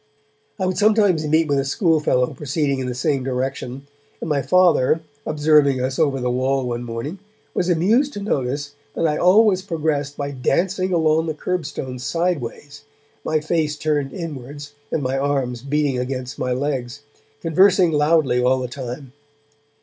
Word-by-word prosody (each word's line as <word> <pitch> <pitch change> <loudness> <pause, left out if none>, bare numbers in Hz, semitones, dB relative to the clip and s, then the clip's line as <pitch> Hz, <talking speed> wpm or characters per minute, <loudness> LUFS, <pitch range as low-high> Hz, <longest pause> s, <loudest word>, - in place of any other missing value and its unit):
I 190 - 0
would 185 -1 -1
sometimes 205 -7 +3
meet 160 +1 +3
with 140 -1 +1
a - - +1
schoolfellow 150 - +1
proceeding 145 -1 -1
in 130 - -3
the 125 - -3
same 135 0 0
direction, 130 0 -3 0.3
and - - -5
my 145 -3 +1
Father, 165 0 +3 0.3
observing 150 -3 +3
us 130 +3 -2
over 140 -4 +2
the 125 0 -1
wall 130 +1 0
one 120 0 -3
morning, 120 +10 -5 0.3
was 180 - 0
amused 220 - +2
to - - -5
notice 145 -6 -2 0.2
that - - 0
I 150 -1 0
always 190 +1 +4
progressed 155 -6 -2
by 140 0 -3
dancing 185 +8 0
along 160 -1 +2
the 155 - -2
curbstone 150 -7 -4
sideways, 145 -2 -3 0.4
my 155 -1 0
face 155 -1 -1
turned 145 -3 -1
inwards 145 -3 -7 0.2
and 150 - -1
my 130 +1 -1
arms 135 -4 -1
beating 140 -1 0
against 130 0 -4
my 125 - -1
legs, 130 -1 -2 0.4
conversing 180 +1 +4
loudly 150 -4 +2
all 130 +1 +3
the 125 - -3
time. 125 +1 -7
145 Hz, 155 wpm, -21 LUFS, 130-165 Hz, 0.4 s, always